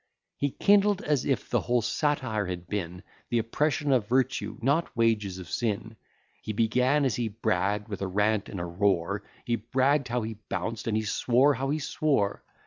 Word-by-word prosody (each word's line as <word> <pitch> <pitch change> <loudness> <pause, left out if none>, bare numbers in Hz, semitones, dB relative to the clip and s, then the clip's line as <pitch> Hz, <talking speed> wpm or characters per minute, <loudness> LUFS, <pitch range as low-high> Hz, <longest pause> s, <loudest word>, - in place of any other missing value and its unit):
He 140 - 0
kindled, 205 +5 +3
as 145 -4 +1
if 135 - 0
the - - +2
whole 120 -1 +1
satire 130 - 0
had 90 -1 -5
been 90 -2 -4 0.3
The 120 - +1
oppression 145 +6 0
of 120 -6 +2
virtue, 130 +2 0
not 140 +4 0
wages 105 -5 +1
of 90 -2 -8
sin: 110 +2 -2 0.5
He 110 - -4
began, 125 +6 +2
as 125 -5 +1
he 120 -2 0
bragg'd, 105 -1 -1
with 100 -3 -6
a 100 - -1
rant 105 +2 +1
and 95 - -5
a 85 - -3
roar; 85 -1 0 0.2
He 120 -1 0
bragg'd 130 +5 +1
how 120 0 -1
he 110 -1 -6
bounced, 115 0 -3
and 110 -1 +1
he 110 - 0
swore 125 +6 +3
how 135 0 -2
he 150 - +1
swore. 145 -8 0
115 Hz, 185 wpm, -28 LUFS, 105-135 Hz, 0.5 s, kindled